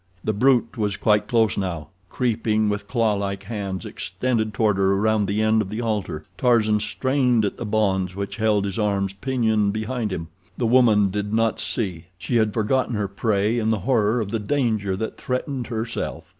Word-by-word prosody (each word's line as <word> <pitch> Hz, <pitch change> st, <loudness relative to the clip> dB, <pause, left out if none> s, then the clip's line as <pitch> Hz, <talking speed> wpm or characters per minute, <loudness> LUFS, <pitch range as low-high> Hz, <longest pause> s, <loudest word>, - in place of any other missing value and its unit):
The 110 Hz, -, 0 dB
brute 120 Hz, +1 st, +2 dB
was 105 Hz, -2 st, 0 dB
quite 105 Hz, -1 st, +2 dB
close 115 Hz, -5 st, +2 dB
now—creeping 100 Hz, -, -1 dB
with 100 Hz, -1 st, -3 dB
clawlike 100 Hz, -5 st, 0 dB
hands 100 Hz, -3 st, -4 dB
extended 110 Hz, +3 st, -2 dB
toward 105 Hz, -1 st, +1 dB
her 95 Hz, 0 st, +3 dB
around 105 Hz, +1 st, +2 dB
the 105 Hz, +2 st, 0 dB
end 110 Hz, 0 st, +3 dB
of 100 Hz, -, -4 dB
the 110 Hz, +2 st, -4 dB
altar. 100 Hz, -9 st, -2 dB
Tarzan 110 Hz, -4 st, +3 dB
strained 125 Hz, -1 st, +1 dB
at 100 Hz, -, -3 dB
the 115 Hz, -, -5 dB
bonds 95 Hz, -4 st, 0 dB
which 100 Hz, 0 st, -4 dB
held 105 Hz, -2 st, +2 dB
his 100 Hz, +1 st, -3 dB
arms 100 Hz, -2 st, 0 dB
pinioned 110 Hz, -3 st, 0 dB
behind 110 Hz, 0 st, -2 dB
him. 80 Hz, -3 st, -4 dB, 0.3 s
The 120 Hz, -, 0 dB
woman 110 Hz, -5 st, +4 dB
did 105 Hz, +1 st, -3 dB
not 115 Hz, 0 st, +1 dB
see—she 95 Hz, +1 st, -3 dB
had 110 Hz, -2 st, +2 dB
forgotten 120 Hz, +3 st, 0 dB
her 105 Hz, -1 st, -1 dB
prey 105 Hz, +3 st, 0 dB
in 110 Hz, -1 st, 0 dB
the 110 Hz, -3 st, 0 dB
horror 120 Hz, -3 st, +2 dB
of 105 Hz, -3 st, -3 dB
the 115 Hz, -, -1 dB
danger 110 Hz, -4 st, 0 dB
that 110 Hz, +3 st, -4 dB
threatened 125 Hz, 0 st, -3 dB
herself. 115 Hz, 0 st, -4 dB
110 Hz, 175 wpm, -23 LUFS, 100-115 Hz, 0.3 s, woman